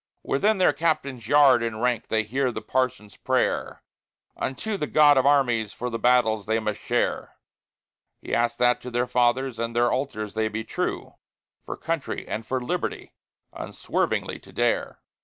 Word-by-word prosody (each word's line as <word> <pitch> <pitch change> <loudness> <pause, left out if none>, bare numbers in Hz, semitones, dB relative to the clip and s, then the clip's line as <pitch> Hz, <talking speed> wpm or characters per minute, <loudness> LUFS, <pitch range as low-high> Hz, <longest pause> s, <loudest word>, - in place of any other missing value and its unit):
Within 210 +10 +1
their 180 -5 +4
Captain's 140 -6 -1
yard 140 -3 +6
enranked 115 +1 -1
they 110 0 +1
hear 130 +4 -1
the - - -6
Parson's 120 -6 -2
prayer - - -1 0.5
Unto 205 +11 -3
the 150 -6 -3
God 145 -1 +6
of 130 0 +3
armies 120 -7 +2
for 125 +1 -4
the 115 - -3
battles 110 -4 +2
they 110 +1 +1
must 105 -2 -3
share; - - -1 0.8
He - - -7
asks 120 0 +1
that 125 0 +3
to 125 - -7
their 120 0 0
Fathers 125 0 +1
and 115 0 -3
their 120 0 +3
Altars 110 -6 -3
they 110 0 0
be 110 +1 -4
true, - - -4 0.5
For - - -6
Country 165 -3 -3
and 110 0 -5
for 130 - -1
Liberty 125 - -4 0.4
unswervingly - - -2
to - - -17
dare. - - -1
125 Hz, 160 wpm, -25 LUFS, 115-135 Hz, 0.8 s, yard